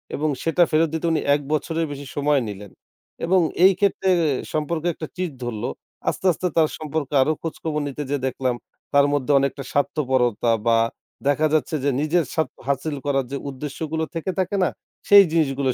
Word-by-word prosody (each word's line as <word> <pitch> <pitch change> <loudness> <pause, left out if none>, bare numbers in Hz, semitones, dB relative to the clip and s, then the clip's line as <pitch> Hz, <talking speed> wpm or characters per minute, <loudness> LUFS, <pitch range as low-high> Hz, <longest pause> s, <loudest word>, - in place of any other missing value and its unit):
এবং 155 +2 0
সেটা 165 +2 +3
ফেরত 160 +1 +4
দিতে 160 +1 -2
উনি 160 - +1
১ 145 - -3
বছরের 165 +2 0
বেশি 145 0 -7
সময় 145 -1 +2
নিলেন। 100 -1 -8 0.5
এবং 185 +2 +4 0.3
এই 195 - +7
ক্ষেত্রে 195 -1 +1 0.4
সম্পর্কে 155 +2 -1
একটা 155 - -7
চিড় 180 -4 -3
ধরলো। 115 -3 -3 0.4
আস্তে, - - -5
আস্তে 180 +2 -2
তার 160 -2 +4
সম্পর্কে 150 -2 -4
আরো 145 - +3
খোঁজখবর 160 -2 -3
নিতে 145 +1 -4
যেয়ে 140 -2 -2
দেখলাম 130 -1 -1 0.4
তার 140 0 +6
মধ্যে 145 0 0
অনেকটা 140 0 -2
স্বার্থপরতা 130 -6 +1 0.2
বা 115 0 +5 0.5
দেখা 145 +2 +3
যাচ্ছে 155 0 +1
যে, 140 - +2
নিজের 165 +3 +2
স্বার্থ 160 - -1
হাসিল 140 +2 -1
করার 135 -2 +1
যে 140 - -2
উদ্দেশ্যগুলো 150 +4 -4
থেকে 165 +3 -2
থাকে 190 +2 0
না, - - +2 0.4
সেই 200 -1 +9
জিনিসগুলোই 140 -5 +1
150 Hz, 170 wpm, -23 LUFS, 135-160 Hz, 0.5 s, সেই